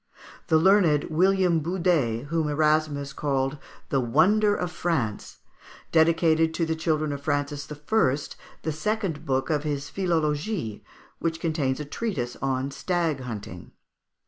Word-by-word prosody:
The 160 - +4
learned 165 -4 +4
William 180 0 +3
Budé, 165 -9 +1
whom 160 +1 -1
Erasmus 150 -1 +1
called 135 0 -1 0.3
the 135 - +2
wonder 195 - +3
of 180 -1 -3
France, 160 -12 -2 0.5
dedicated 160 0 +3
to 165 - +1
the 160 0 -1
children 155 -2 0
of 140 -1 -5
Francis 145 0 -2
I. 150 -1 +1 0.5
the 160 - -1
second 165 -2 -2
book 135 +2 0
of 150 -2 +1
his 145 -2 -3
"Philologie," 160 - -1 0.4
which 165 -1 -2
contains 150 -5 -1
a 150 - -4
treatise 140 - -3
on 135 0 -1
stag 165 -1 -1
hunting. 105 -8 -8
155 Hz, 130 wpm, -26 LUFS, 140-170 Hz, 0.5 s, The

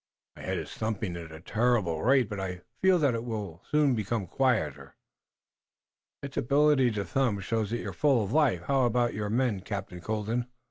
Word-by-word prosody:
"My - - -11
head - - -2
is - - -6
thumping 110 -4 -3
at 85 -2 -8
a 80 - -9
terrible 105 -7 +1
rate, 130 -1 +4
but 105 -2 -5
I 90 -2 -4 0.2
feel 190 -1 +5
that 145 -6 +2
it 115 0 -2
will 105 -8 -5
soon 150 -3 +3
become 110 -2 -1
quieter." 80 - -1 1.3
"Its 140 -1 -7
ability 140 0 +4
to 100 -2 -2
thump 115 -8 0
shows 110 0 -1
that 120 - -1
you're - - -5
full 135 -7 +3
of 100 +4 -4
life. 135 - +3
How 135 -3 +2
about 120 0 +1
your 105 0 -3
men, 115 -2 +1
Captain 95 -2 -6
Colden?" 110 +5 -2
110 Hz, 185 wpm, -28 LUFS, 95-130 Hz, 1.3 s, feel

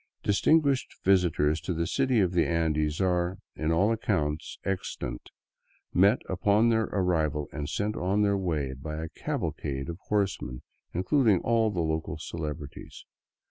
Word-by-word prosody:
Distinguished 140 +5 +2
visitors 85 -5 +3
to 90 - -3
the 85 +1 0
cities 130 +3 +2
of 90 - 0
the 85 -2 +2
Andes 75 -2 0
are, 90 0 +1 0.2
in 80 +1 -1
all 95 +7 +3
accounts 85 - -1
extant, 95 -9 -4 0.6
met 100 +6 +4
upon 100 +5 +3
their 110 -1 +2
arrival 80 -7 0
and 75 -1 -4
sent 105 +6 -1
on 100 +4 +1
their 100 -1 +3
way 80 -8 -1
by 75 +4 -6
a 80 +1 -4
cavalcade 70 -1 -3
of 85 +1 -6
horsemen 95 -12 -1 0.3
including 105 - +3
all 115 -1 +2
the 90 -5 -1
local 80 0 -2
celebrities. 75 -3 -7
90 Hz, 140 wpm, -28 LUFS, 80-105 Hz, 0.6 s, met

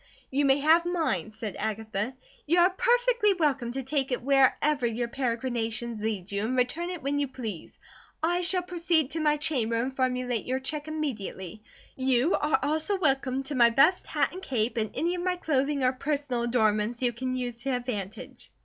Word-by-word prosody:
"You 280 +2 +2
may 270 0 +5
have 320 +3 +5
mine," 320 - -1
said 215 -2 -6
Agatha. 220 +2 -3 0.3
"You 340 +4 +3
are 360 +2 +5
perfectly 475 0 +2
welcome 275 -8 0
to 270 0 -3
take 270 0 -1
it 250 - -2
wherever 275 0 +3
your 235 +1 -2
peregrinations 235 -2 -2
lead 205 -4 -3
you, 200 +1 -1
and 250 +4 -1
return 315 +8 0
it 355 -6 -6
when 285 +1 0
you 285 - 0
please. 225 -9 -7 0.5
I 350 +2 +2
shall 360 +1 +3
proceed 335 -5 0
to 325 - -2
my 300 -1 +2
chamber 270 -7 0
and 255 +3 -1
formulate 250 -3 -1
your 260 +1 0
check 295 +3 -5
immediately. 220 - -5 0.3
You 260 +4 +2
are 300 +1 +2
also 315 +7 0
welcome 270 -5 +1
to 280 +2 -5
my 240 -3 +6
best 275 +10 +3
hat - - 0
and 370 - -7
cape, 240 - -1
and 215 -1 0
any 340 +2 0
of 355 - -3
my 365 0 0
clothing 285 -4 0
or 255 0 +3
personal 280 -2 -2
adornments 230 0 +1
you 240 -1 +2
can 255 +2 -3
use 245 -2 -4
to 275 - -3
advantage." 220 -4 -6
265 Hz, 185 wpm, -27 LUFS, 235-310 Hz, 0.5 s, my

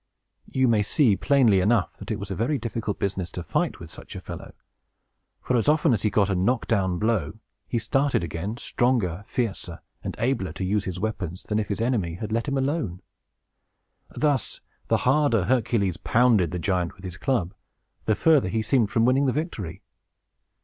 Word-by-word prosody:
You 130 -1 +2
may 110 -3 +3
see, 110 +1 +3
plainly 120 -7 +4
enough, 105 0 +1
that - - -9
it 110 - -1
was 100 -1 -6
a - - -2
very 125 +9 0
difficult 115 -3 -3
business 95 -3 -2
to 90 - -5
fight - - -1
with - - -10
such - - -10
a - - -4
fellow; - - -9 0.9
for, 125 - 0
as 120 +4 +2
often 150 -4 +4
as 105 - 0
he 105 - +2
got 100 -1 +2
a - - +2
knock 100 +7 +1
down 95 -5 +1
blow, 110 -6 +1
up - - -11 0.3
he 120 - -1
started 135 +1 +1
again, 85 +7 -4
stronger, 110 -9 0
fiercer, 105 -9 -3 0.2
and - - -4
abler 115 -9 -1
to 95 - -5
use 100 +2 0
his 90 -1 -4
weapons, 95 -4 -3
than 105 0 -1
if 105 - -2
his 100 +2 -3
enemy 110 -9 0
had 105 +4 -6
let 115 +5 -1
him 140 -1 0
alone. 135 - -2 1.1
Thus, 145 -6 0 0.3
the - - +1
harder 130 -6 +3
Hercules 110 -6 +1
pounded 115 -7 +3
the 90 - -3
giant 90 -1 -1
with 95 - -17
his 90 -2 -6
club, 95 -4 0 0.5
the 110 - +2
further 150 - +4
he 110 +2 -1
seemed 115 -2 +2
from 115 +1 +2
winning 135 +3 +3
the 130 - +1
victory. 115 - -4
110 Hz, 190 wpm, -25 LUFS, 95-125 Hz, 1.1 s, plainly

